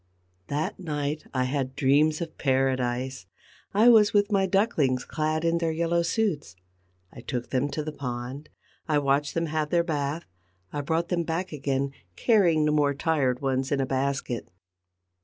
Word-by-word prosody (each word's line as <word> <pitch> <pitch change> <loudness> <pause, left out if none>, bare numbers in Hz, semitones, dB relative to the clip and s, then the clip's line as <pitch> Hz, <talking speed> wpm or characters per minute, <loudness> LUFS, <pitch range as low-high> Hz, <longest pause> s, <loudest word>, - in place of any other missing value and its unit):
That 150 +2 -2
night 150 -3 -3
I 130 -1 0
had 130 0 -2
dreams 150 +3 +3
of 165 -2 -6
paradise: 130 -4 0 0.4
I 215 +4 +4
was 215 -3 +6
with 205 0 +3
my 195 -1 +3
ducklings, 165 - +1
clad 155 +1 -1
in 165 0 +2
their 165 -1 0
yellow 170 +1 +1
suits; 170 - -1 0.6
I - - -10
took 125 -1 -4
them 135 +2 +1
to 150 +2 -3
the 155 - -4
pond, 130 +1 -6 0.4
I 155 -2 +2
watched 145 0 +1
them 165 0 +1
have 155 -1 -1
their 170 +1 +3
bath, 150 0 -2 0.5
I 145 - -2
brought 160 +4 -1
them 175 -2 +1
back 170 +3 -3
again, 140 -2 -1 0.2
carrying 175 -9 +3
the 150 - +2
more 145 -2 +2
tired 140 -4 0
ones 135 0 0
in 140 - +1
a 135 - +1
basket. 135 -2 -2
150 Hz, 165 wpm, -26 LUFS, 135-165 Hz, 0.6 s, was